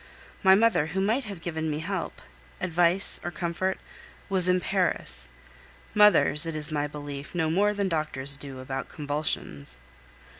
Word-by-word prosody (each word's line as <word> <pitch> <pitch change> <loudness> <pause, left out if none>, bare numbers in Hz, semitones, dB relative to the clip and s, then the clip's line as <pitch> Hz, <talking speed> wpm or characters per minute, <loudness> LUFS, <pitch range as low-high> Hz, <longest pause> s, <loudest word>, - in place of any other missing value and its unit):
My 190 -1 +6
mother, 215 -7 +3
who 180 +4 -3
might 225 +7 0
have 200 -5 -8
given 160 -2 -3
me 150 - -2
help, 170 +3 -5 0.4
advice, 175 +1 +3
or - - -3
comfort, 175 +2 -2 0.5
was 185 -2 +5
in 180 0 +3
Paris. 180 - 0 0.7
Mothers, 200 -7 +5
it 165 - -4
is 150 0 -3
my 145 -1 -1
belief, 145 +1 -8
know 160 -2 0
more 205 +5 +2
than 200 -1 -1
doctors 150 -5 -1
do 140 -2 -8
about 135 0 -5
convulsions. 145 - -3
165 Hz, 150 wpm, -26 LUFS, 145-190 Hz, 0.7 s, My